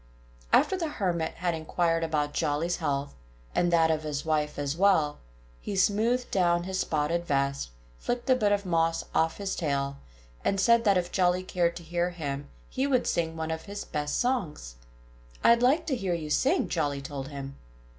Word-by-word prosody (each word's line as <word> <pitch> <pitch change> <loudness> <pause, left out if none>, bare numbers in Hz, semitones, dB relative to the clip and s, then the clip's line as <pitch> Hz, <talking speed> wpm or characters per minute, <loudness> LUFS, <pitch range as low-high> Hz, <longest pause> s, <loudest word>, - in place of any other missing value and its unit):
After - - +4
the 345 -3 -2
Hermit 175 - -2
had 175 0 -1
inquired 165 +1 0
about 150 -2 -1
Jolly's 160 +2 0
health, 140 -3 -2 0.4
and 175 0 +2
that 165 -1 +4
of 155 -1 0
his 150 -1 -4
wife 150 -1 0
as 145 0 -2
well, 165 -6 +3 0.4
he 200 - -5
smoothed 220 +6 +2
down 175 -2 +2
his 190 +1 -3
spotted 165 +2 0
vest, 140 - 0 0.3
flicked 245 +2 -3
a 260 - +5
bit 210 -5 +2
of 205 -1 +1
moss 165 -2 +1
off 160 0 +1
his 200 -1 -3
tail, 140 -4 -1 0.5
and 195 - +1
said 235 +3 +4
that 200 -2 +5
if 175 0 -1
Jolly 180 -1 +2
cared 175 -2 0
to 170 - -8
hear 175 +2 -1
him 145 -5 -5 0.2
he 270 +1 -1
would 255 -3 +2
sing 165 -1 -1
one 160 0 -3
of 160 0 -4
his 200 0 -6
best 145 -1 -2
songs. 190 - -1 0.7
"I'd 235 0 +6
like 285 +7 +3
to 295 -5 0
hear 190 -7 -1
you 155 -3 -5
sing!" 280 - +2
Jolly 145 -4 -1
told 135 -1 -5
him. 140 -1 -7
170 Hz, 185 wpm, -28 LUFS, 150-195 Hz, 0.7 s, I'd